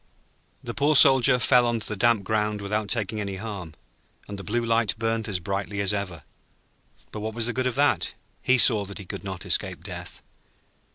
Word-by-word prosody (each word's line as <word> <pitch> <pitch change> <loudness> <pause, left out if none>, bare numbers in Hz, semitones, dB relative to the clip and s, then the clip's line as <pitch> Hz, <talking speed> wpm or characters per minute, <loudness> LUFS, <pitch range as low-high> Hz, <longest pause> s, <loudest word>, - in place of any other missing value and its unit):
The 120 - -5
poor 145 +3 +1
Soldier 135 -2 +7
fell 125 0 +3
on 120 -1 -1
to - - 0
the 105 - -3
damp 115 0 +2
ground 105 +1 -1
without 105 +1 -3
taking 110 -2 -2
any 100 -1 -4
harm, 95 -6 -7 0.5
and 100 -1 -7
the - - -7
Blue 115 +6 -2
Light 115 -1 +1
burnt 115 0 -2
as 95 -4 -2
brightly 100 +2 -4
as 100 0 +1
ever. 90 -7 -5 0.9
But 105 - -7
what 110 +1 -5
was 115 -1 -1
the 120 - -2
good 130 +1 -1
of 125 - -3
that? 145 +1 +1 0.3
He 130 - +3
saw 110 -4 +6
that 100 0 -9
he 100 - -8
could - - -7
not 95 -2 -7
escape - - -1
death. - - -9
110 Hz, 205 wpm, -25 LUFS, 100-120 Hz, 0.9 s, Soldier